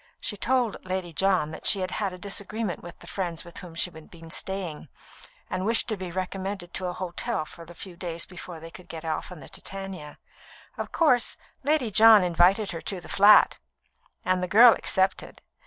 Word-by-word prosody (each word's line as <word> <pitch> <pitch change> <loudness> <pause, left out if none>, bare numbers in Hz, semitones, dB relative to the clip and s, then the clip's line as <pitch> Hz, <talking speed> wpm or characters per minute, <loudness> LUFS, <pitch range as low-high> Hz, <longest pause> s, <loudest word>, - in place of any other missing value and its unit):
She 210 - -3
told 245 +1 0
Lady 185 -2 -4
John 185 -2 +2
that - - -4
she 200 - +4
had 185 0 -3
had 200 -3 -2
a 180 - -8
disagreement 200 +1 -3
with 175 -1 -11
the - - -15
friends 175 -3 -4
with 170 - -10
whom 175 -2 -10
she 180 +1 +1
had 160 -2 -14
been 165 -1 -13
staying, 180 -6 -4 0.6
and 185 - -3
wished 225 +3 +2
to 215 - 0
be 185 -2 -6
recommended 185 0 -4
to 185 - -3
a 180 - -3
hotel 185 +1 -3
for 170 +2 -12
the 175 +1 -13
few 185 0 -9
days 170 -1 -4
before 180 -2 -9
they 165 +1 -10
could 180 - -13
get 165 0 -7
off 160 +3 -3
on 175 -4 -10
the - - -11
Titania. 195 -6 -6 0.6
Of - - -5
course, 255 -8 +2 0.3
Lady 280 -5 +1
John 220 -1 +8
invited 180 +4 +3
her 165 - -6
to 195 - -4
the - - -13
flat, 205 +2 +6 0.7
and 185 0 +1
the 180 - -1
girl 230 +5 +8
accepted. 190 0 -1
185 Hz, 200 wpm, -26 LUFS, 170-200 Hz, 0.7 s, John